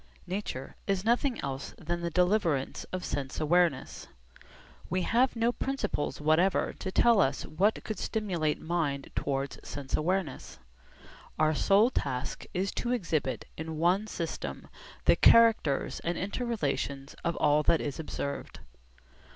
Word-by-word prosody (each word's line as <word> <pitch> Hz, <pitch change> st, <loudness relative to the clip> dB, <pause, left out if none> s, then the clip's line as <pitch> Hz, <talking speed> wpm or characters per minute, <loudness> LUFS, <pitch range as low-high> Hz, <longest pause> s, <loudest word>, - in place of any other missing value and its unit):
Nature 180 Hz, -8 st, -5 dB
is 195 Hz, -1 st, 0 dB
nothing 240 Hz, +2 st, +2 dB
else 135 Hz, 0 st, -5 dB
than 175 Hz, +1 st, -3 dB
the 170 Hz, -, -1 dB
deliverance 180 Hz, -5 st, +1 dB
of 185 Hz, -1 st, -5 dB
sense 135 Hz, -2 st, -3 dB
awareness. 165 Hz, -2 st, +1 dB, 0.8 s
We 185 Hz, +1 st, 0 dB
have 245 Hz, +6 st, +2 dB
no 230 Hz, +1 st, +2 dB
principles 245 Hz, -, -2 dB
whatever 155 Hz, +5 st, +2 dB
to 190 Hz, -, -4 dB
tell 230 Hz, 0 st, +5 dB
us 135 Hz, -3 st, 0 dB
what 195 Hz, +8 st, +1 dB
could 215 Hz, -, -4 dB
stimulate 175 Hz, -9 st, -1 dB
mind 155 Hz, -5 st, -2 dB
towards 135 Hz, 0 st, -2 dB
sense 140 Hz, -2 st, -4 dB
awareness. 170 Hz, -, -2 dB, 0.8 s
Our 155 Hz, 0 st, +3 dB
sole 200 Hz, -, +4 dB
task 130 Hz, -, -3 dB
is 190 Hz, +2 st, -1 dB
to 240 Hz, -, -2 dB
exhibit 165 Hz, -, -1 dB
in 160 Hz, 0 st, -5 dB
one 180 Hz, +6 st, +2 dB
system 170 Hz, -6 st, -5 dB, 0.4 s
the -, -, +6 dB
characters 225 Hz, -11 st, +5 dB
and 170 Hz, +1 st, -2 dB
inter 205 Hz, +6 st, -3 dB
relations 140 Hz, -9 st, -2 dB
of 170 Hz, 0 st, 0 dB
all 150 Hz, 0 st, +3 dB
that 160 Hz, +1 st, +3 dB
is 145 Hz, 0 st, -4 dB
observed. 140 Hz, -2 st, -5 dB
170 Hz, 135 wpm, -29 LUFS, 145-205 Hz, 0.8 s, the